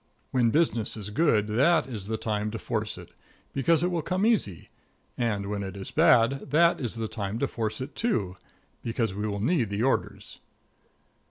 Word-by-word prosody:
When 120 -3 +3
business 120 -7 +1
is 105 -1 -6
good, 110 -5 +3
that 135 +9 +3
is 110 -7 -7
the 110 0 -2
time 105 -1 -2
to 115 - -5
force 110 -2 -3
it, - - -11 0.4
because 155 +4 +2
it 180 - +1
will 170 -2 0
come 185 +6 0
easy; 180 - 0 0.5
and 105 -5 -1
when 100 0 -3
it 100 0 -6
is 95 - -7
bad, 130 +5 +4
that 170 +4 +4
is 120 -4 -3
the 115 -1 -3
time 105 -1 -4
to 140 - +1
force 110 -3 -3
it, 135 +3 -6
too, 105 - 0 0.5
because 115 -3 -1
we 105 +2 -2
will 100 -1 -3
need 120 - +1
the 100 +2 -1
orders. 135 - -1
115 Hz, 185 wpm, -27 LUFS, 105-140 Hz, 0.5 s, bad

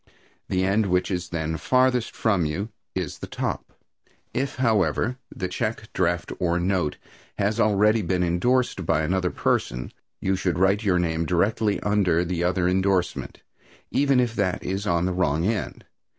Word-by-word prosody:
The 95 0 +1
end 100 +2 +2
which 90 +1 +1
is 90 -1 -2
then 80 -1 -2
farthest 125 +3 +2
from 100 -6 +1
you 90 +8 -2 0.3
is - - -3
the - - -6
top. - - -4 0.6
If, 135 +2 -1
however, 120 +1 +1
the 90 - -4
check, 110 +4 -4
draft 85 -1 0
or 85 -1 +1
note 90 -4 0 0.4
has 105 +3 0
already 105 +1 +4
been 90 -3 0
indorsed 95 +5 +1
by 80 -1 +1
another 90 +3 +1
person, 60 -6 -1 0.3
you 95 0 0
should 90 -3 -1
write 95 +4 +3
your 95 -4 +3
name 80 -1 0
directly 105 +4 +1
under 95 -5 +2
the 85 0 -2
other 90 0 +1
indorsement, 95 0 0 0.5
even 140 -2 +3
if 120 -2 +1
that 95 -4 0
is 95 +2 -3
on 85 -2 +2
the 95 - 0
wrong 85 -3 +1
end. 110 -1 -2
95 Hz, 160 wpm, -25 LUFS, 90-105 Hz, 0.6 s, already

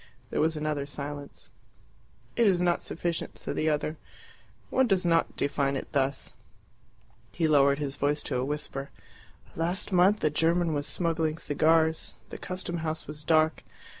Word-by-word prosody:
There - - +1
was 160 0 +1
another 150 -2 -2
silence. 145 0 -7 0.8
"It 235 -2 +4
is 185 -3 +4
not 175 -1 +2
sufficient," 170 0 -3
said - - -3
the 155 - +1
other. 150 +1 -1 0.7
"One 260 -1 +3
does 190 -4 +2
not 165 -1 +2
define 140 -1 0
it 135 - -5
thus." 135 -1 0 1.0
He 165 -2 +1
lowered 140 -2 +5
his 140 -2 -3
voice 145 +1 0
to 130 - -2
a 125 - 0
whisper. 140 -1 -3 0.7
"Last 175 +5 -1
month 190 +3 +4
a 155 - +3
German 165 +2 +2
was 145 0 -1
smuggling 165 -2 0
cigars. 160 +1 +2
The - - -8
custom 185 -1 -4
house 160 -1 -3
was 150 0 -9
dark. 155 +1 +3
155 Hz, 155 wpm, -28 LUFS, 145-170 Hz, 1.0 s, lowered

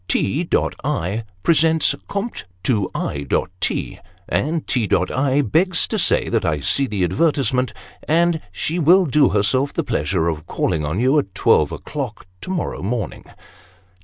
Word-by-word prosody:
" - - -37
T. 155 - 0 0.3
I. 115 - -2 0.2
presents 160 +1 +3
compt. 200 - -4 0.2
to 105 -7 +1
I. 70 -1 -3 0.3
T. - - -2 0.3
and 160 +3 -1
T. 115 -6 -1 0.2
I. 135 +1 +2
begs 165 - +2
To - - 0
say - - +2
that - - 0
i 75 -3 0
see 135 - +2
the 105 -5 -1
advertisement 130 - +1 0.4
And 165 +1 +2
she 155 - -2
will 180 +4 +5
Do 145 -1 +3
Herself 130 +7 +1
the - - -1
pleasure 75 +3 0
of 80 -1 -3
calling 75 - -1
On 75 +6 -2
you 130 +5 +3
at 95 -10 -5
12 - - +3
o'clock - - -6 0.2
to - - -8
morrow 185 -2 -3
morning. 110 +3 -3
130 Hz, 155 wpm, -20 LUFS, 95-160 Hz, 0.4 s, will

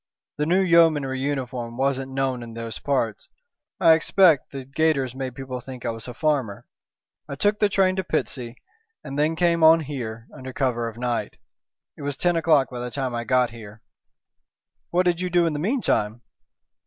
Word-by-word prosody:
"The 150 - +1
new 185 +3 +3
Yeomanry 160 -7 +3
uniform 130 -4 -3
wasn't 135 0 -1
known 130 -2 -1
in 115 -1 -9
those 115 -2 -6
parts. 125 -7 -2 0.5
I 165 -2 +7
expect 165 -2 +3
the 135 -2 -7
gaiters 140 -2 0
made 130 -2 -5
people 130 -1 -6
think 130 -2 -9
I - - 0
was 115 +1 -8
a 125 - -8
farmer. 135 -9 -1 0.6
I 140 - -4
took 205 +8 +1
the 210 - +3
train 190 -1 +2
to 190 - 0
Pitsea, 130 -7 -3 0.5
and 140 0 -5
then 155 +2 +2
came 170 -1 +2
on 160 +1 +7
here 120 -6 -6
under 130 0 -8
cover 120 -4 0
of 115 - -13
night. 120 -1 -3 0.6
It - - -13
was 140 -1 -3
ten 175 -1 +1
o'clock 155 -5 +3
by 125 - -6
the 125 0 -4
time 130 -1 -3
I 120 0 -3
got 125 -1 +2
here." 110 -1 -12 1.1
"What 180 +1 +1
did 175 0 +1
you 180 - -1
do 175 -1 +3
in 165 - 0
the 145 - -3
meantime?" 145 - 0
135 Hz, 185 wpm, -24 LUFS, 125-160 Hz, 1.1 s, I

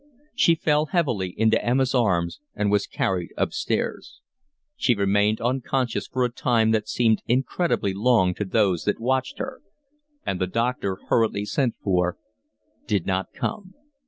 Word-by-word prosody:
She 170 - +4
fell 155 -1 +1
heavily 125 - 0
into 110 0 +3
Emma's 130 +2 +1
arms 90 -9 +1 0.2
and 105 0 0
was 105 -1 +2
carried 90 -3 -1
upstairs. 295 +2 -2 0.6
She 125 - +2
remained 100 +2 +2
unconscious 125 0 -1
for 130 -1 0
a 120 - -2
time 115 -3 +2
that 110 -1 0
seemed 115 -3 +2
incredibly 130 - 0
long 100 -3 +3
to 105 - -3
those 95 -3 +1
that 105 - 0
watched 130 +2 -1
her, 260 0 -6 0.6
and 90 - -2
the 95 - +1
doctor, 115 -2 -1
hurriedly 110 -3 +2
sent 125 +3 0
for, 90 -2 +1 0.7
did 100 -5 0
not 95 0 -1
come. 185 - -5
110 Hz, 145 wpm, -24 LUFS, 100-130 Hz, 0.7 s, She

